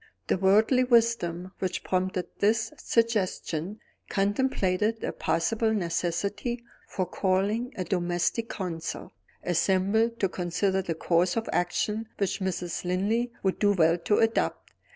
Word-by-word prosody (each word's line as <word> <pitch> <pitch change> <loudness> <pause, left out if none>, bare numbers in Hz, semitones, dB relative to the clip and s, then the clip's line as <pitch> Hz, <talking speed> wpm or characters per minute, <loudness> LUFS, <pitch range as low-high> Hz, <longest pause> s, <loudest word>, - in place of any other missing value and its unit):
The - - +1
worldly 215 +7 +4
wisdom 230 -8 +2
which 185 -1 -2
prompted 185 -1 -1
this 225 +2 +2
suggestion 205 -4 -1 0.3
contemplated 205 0 0
a - - -1
possible 220 +6 0
necessity 200 +6 -2 0.2
for 185 - -2
calling 200 +7 0
a 185 - -2
domestic 175 +5 -1
council, 165 -4 -5 0.3
assembled 195 +6 +1
to 195 - +2
consider 190 +2 0
the 170 -3 -3
course 175 +2 +1
of 225 - -1
action 210 +5 -1
which 200 -3 -1
Mrs. 180 -2 -2
Linley 205 +7 0
would 190 -1 0
do 205 -1 +4
well 165 -3 +4
to 180 +4 +1
adopt. 225 0 0
195 Hz, 125 wpm, -27 LUFS, 180-225 Hz, 0.3 s, worldly